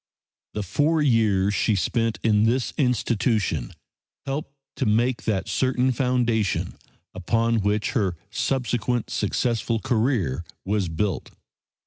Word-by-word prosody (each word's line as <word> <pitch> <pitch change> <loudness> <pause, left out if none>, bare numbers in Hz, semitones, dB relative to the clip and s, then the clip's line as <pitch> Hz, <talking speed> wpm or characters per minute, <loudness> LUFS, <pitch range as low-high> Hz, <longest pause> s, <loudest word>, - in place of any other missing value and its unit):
The 105 - -1
four 150 - +1
years 105 -7 +3
she 105 0 +2
spent 115 +3 0
in 110 -1 +4
this 120 0 +1
institution 115 - 0 0.5
helped 140 +1 -4 0.2
to - - 0
make 115 +4 +1
that 95 -4 0
certain 130 0 +1
foundation 120 -5 0 0.4
upon 115 +5 +1
which 105 +1 0
her 100 -9 0 0.2
subsequent 120 -2 -1
successful 115 +2 0
career 110 - 0 0.2
was 100 -2 0
built. 80 -1 -2
115 Hz, 110 wpm, -24 LUFS, 105-125 Hz, 0.5 s, in